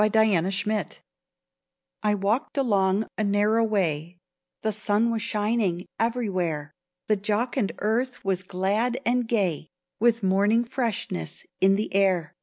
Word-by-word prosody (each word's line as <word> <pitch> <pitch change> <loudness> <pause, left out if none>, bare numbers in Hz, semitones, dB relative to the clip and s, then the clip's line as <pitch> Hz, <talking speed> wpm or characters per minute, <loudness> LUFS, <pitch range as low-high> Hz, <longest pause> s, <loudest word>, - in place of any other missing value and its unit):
THE 215 - +4
CLOSED 200 -2 +2
GATE 215 0 -2 1.0
1 210 -2 +1
WALKED 225 +10 0
along 200 -5 +2
a - - +2
narrow 210 +3 +2
way; 175 -6 -1 0.5
The 220 - +1
sun 215 +2 +1
was 225 -1 -1
shining 210 -5 0
everywhere; 185 -11 -1 0.3
The 215 - +2
jocund 215 +2 -1
earth 230 +3 -1
was 190 -2 0
glad 200 +7 -1
and 245 0 +1
gay, 185 -9 0 0.3
With 230 0 +2
morning 200 +5 +3
freshness 230 - -3
in 195 +1 +5
the 210 0 -3
air. 185 -5 +2
210 Hz, 130 wpm, -25 LUFS, 190-225 Hz, 1.0 s, in